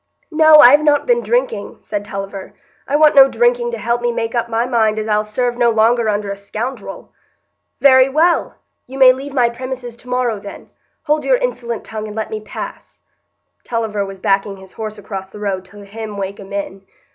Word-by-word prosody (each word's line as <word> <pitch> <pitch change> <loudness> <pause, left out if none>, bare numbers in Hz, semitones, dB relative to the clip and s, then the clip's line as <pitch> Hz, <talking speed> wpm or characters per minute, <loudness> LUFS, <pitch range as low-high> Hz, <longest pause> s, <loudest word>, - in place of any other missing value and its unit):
"No, 315 -1 +6
I've 290 +4 +7
not 295 -1 +2
been 480 -1 +2
drinking," - - -2
said 205 -1 -4
Tulliver; 195 -1 -7 0.3
"I 280 - -1
want 305 0 +5
no 270 -1 +7
drinking 240 0 +1
to 235 - -4
help 235 +2 -1
me 240 0 0
make 230 -1 -3
up 235 -1 -1
my 230 +1 0
mind 220 -4 +1
as 215 0 -3
I'll 210 0 +1
serve 240 +3 -2
no 240 -1 +4
longer 225 0 +2
under 205 -1 -2
a - - -4
scoundrel." 215 +1 -7 0.7
"Very 260 -1 +6
well! 325 +5 +1 0.3
you 265 +2 -9
may 260 -1 +7
leave 275 +2 -8
my 245 -3 +4
premises 245 0 -6
to 250 - -14
morrow, 250 -4 -1
then; 200 0 -11 0.3
hold 300 -1 0
your - - +3
insolent 240 - -4
tongue 215 -1 -6
and 210 - -9
let 220 -1 -4
me 215 - -3
pass." 215 - -9 0.6
(Tulliver 220 -3 -2
was 195 -1 -8
backing 195 +1 0
his 190 -1 -15
horse 215 -1 -6
across 195 -2 -7
the 200 - -12
road 195 -3 -3
to 205 0 -14
hem 215 0 -8
Wakem 195 0 -6
in.) 195 -1 -5
230 Hz, 195 wpm, -17 LUFS, 205-260 Hz, 0.7 s, I've